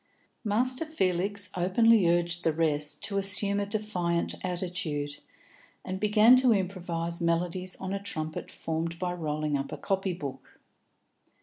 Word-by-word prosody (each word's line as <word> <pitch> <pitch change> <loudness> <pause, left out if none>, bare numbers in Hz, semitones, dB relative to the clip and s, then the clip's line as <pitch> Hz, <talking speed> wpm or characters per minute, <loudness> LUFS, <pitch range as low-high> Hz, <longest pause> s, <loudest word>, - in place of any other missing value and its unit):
Master 250 +6 +1
Felix 200 - 0
openly 190 +2 +4
urged 175 0 +1
the 160 - +2
rest 150 -2 0
to 200 -2 +1
assume 200 +1 +3
a 200 - -2
defiant 185 -5 -1
attitude, 175 -5 -2 0.7
and 185 0 -4
began 215 +4 +6
to 255 -1 +5
improvise 175 -3 -2
melodies 175 +2 -1
on 190 0 -5
a 200 - -3
trumpet 160 -5 -3
formed 165 +1 -4
by 180 0 -2
rolling 155 -3 -2
up 140 0 -3
a - - -5
copy 195 -1 -1
book. 140 -5 -8
180 Hz, 135 wpm, -28 LUFS, 165-200 Hz, 0.7 s, began